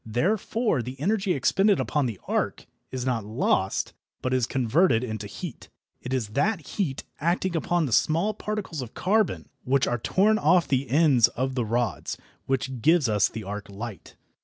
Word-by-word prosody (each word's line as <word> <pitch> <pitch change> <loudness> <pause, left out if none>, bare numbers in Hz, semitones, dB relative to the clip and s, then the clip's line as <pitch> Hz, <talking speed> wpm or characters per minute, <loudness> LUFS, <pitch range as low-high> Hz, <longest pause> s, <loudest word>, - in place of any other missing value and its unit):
Therefore 190 - 0
the 125 +3 -7
energy 195 +3 +1
expended 195 - +3
upon 145 -4 0
the 110 -5 -5
arc - - -1 0.2
is 130 -1 -4
not 120 -4 0
lost, 110 +2 0 0.3
but 130 - 0
is 125 -2 +2
converted 130 +1 +2
into 110 -4 -4
heat. 145 - -8 0.3
It 125 - -6
is 125 -6 -1
that 170 - 0
heat, 150 -8 -3 0.2
acting 175 +3 0
upon 170 +1 +1
the 130 - -4
small 165 - +2
particles 210 -10 -4
of 120 -2 -8
carbon 185 - +1
which 135 +1 +2
are 120 - -1
torn 210 - +2
off 170 +3 +4
the 130 -1 0
ends 135 -5 +5
of 130 +2 -3
the 125 -3 -1
rods, 115 0 -1 0.3
which 130 -2 -2
gives 160 0 +4
us 105 -3 +3
the 110 - -6
arc 105 +1 -6
light. 105 0 -8
130 Hz, 170 wpm, -26 LUFS, 115-175 Hz, 0.3 s, ends